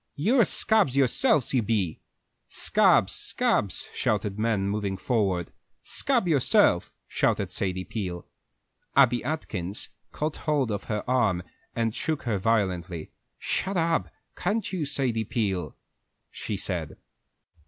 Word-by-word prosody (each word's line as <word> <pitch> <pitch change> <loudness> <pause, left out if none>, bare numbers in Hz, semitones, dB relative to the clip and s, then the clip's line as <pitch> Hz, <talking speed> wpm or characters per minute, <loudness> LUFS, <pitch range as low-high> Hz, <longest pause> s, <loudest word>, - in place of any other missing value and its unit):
You're 225 - +3
scabs 195 - +3
yourselves, 140 - +3
you 130 - +3
be!" 105 -7 -1 0.5
"Scabs, - - +3
scabs!" - - 0
shouted 105 -1 -1
the - - -3
men, 110 -4 +1
moving 100 -1 -2
forward. 95 -6 0 0.3
"Scab 245 -8 +1
yourself!" 145 -6 +3 0.2
shouted - - 0
Sadie 95 -1 -2
Peel. 90 -4 -5 0.7
Abby 125 -4 +4
Atkins 110 - -4 0.2
caught 155 +1 -3
hold 145 -6 0
of 100 - -3
her 105 +1 -3
arm 110 -9 +2 0.3
and 115 -2 0
shook 155 -2 -2
her 110 -5 -1
violently. 90 -6 -1 0.3
"Shut 195 0 -2
up, 165 0 +1 0.3
can't 205 +3 -2
you, 170 -5 -1
Sadie 130 -5 0
Peel," 95 - -2 0.6
she - - -4
said. - - -3
115 Hz, 120 wpm, -26 LUFS, 100-150 Hz, 0.7 s, Abby